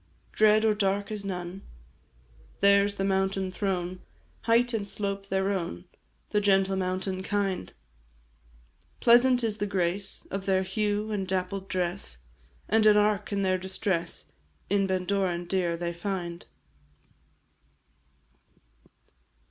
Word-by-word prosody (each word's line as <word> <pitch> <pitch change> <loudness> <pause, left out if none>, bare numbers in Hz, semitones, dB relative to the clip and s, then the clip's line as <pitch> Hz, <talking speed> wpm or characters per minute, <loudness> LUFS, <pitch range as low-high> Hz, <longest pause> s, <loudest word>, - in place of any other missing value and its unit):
Dread 215 0 +4
or 220 - +4
dark 200 0 0
is 210 -2 -3
none; 180 -1 -5 1.0
Their 200 0 +5
's 205 - -4
the 195 - -2
mountain 190 -1 0
throne, 185 -2 -2 0.5
Height 235 +2 +3
and 205 -3 -1
slope 200 -1 -3
their 190 0 0
own, 170 - -3 0.5
The 210 - +2
gentle 195 -1 +3
mountain 185 0 -2
kind; 195 -1 -1 1.3
Pleasant 245 +1 +5
is 215 -2 -1
the 205 - -1
grace 190 0 -2
Of 195 0 -4
their 190 -1 +3
hue, 210 +2 -1
and 195 -3 -2
dappled 190 +1 -2
dress, 180 - -3 0.5
And 220 0 +4
an 210 -1 +7
ark 210 0 +2
in 200 -1 0
their 185 -1 +1
distress, 185 -2 -2 0.4
In 200 -1 +3
Bendorain 185 -1 0
dear 175 -2 0
they 170 0 -3
find. 175 -1 -4
195 Hz, 125 wpm, -28 LUFS, 185-205 Hz, 1.3 s, an